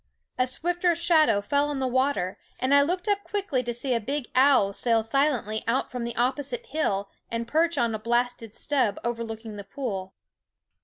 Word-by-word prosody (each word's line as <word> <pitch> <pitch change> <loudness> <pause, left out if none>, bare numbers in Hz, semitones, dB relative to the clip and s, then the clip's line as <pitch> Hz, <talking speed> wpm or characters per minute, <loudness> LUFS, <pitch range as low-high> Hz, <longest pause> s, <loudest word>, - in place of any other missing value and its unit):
A 255 - +3
swifter 350 +6 0
shadow 315 - +4
fell 285 +7 +1
on 290 - -2
the 265 - -1
water, 260 -7 0 0.2
and 260 +2 +1
I 285 - +7
looked 355 +7 -1
up 405 -1 +1
quickly 385 -11 -1
to 240 -1 -3
see 245 +2 -2
a 235 - +2
big 275 +4 -4
owl 260 -7 +5
sail 230 +1 +2
silently 230 -3 0
out 245 +3 0
from 250 -2 -3
the 235 - -5
opposite 280 - -1
hill 205 - -1 0.2
and 230 0 -3
perch 325 +4 +2
on 235 -3 +1
a 220 - -3
blasted 240 0 -1
stub 260 -9 0
overlooking 225 -2 -4
the 200 - -6
pool. 195 -5 -5
255 Hz, 185 wpm, -26 LUFS, 230-290 Hz, 0.2 s, I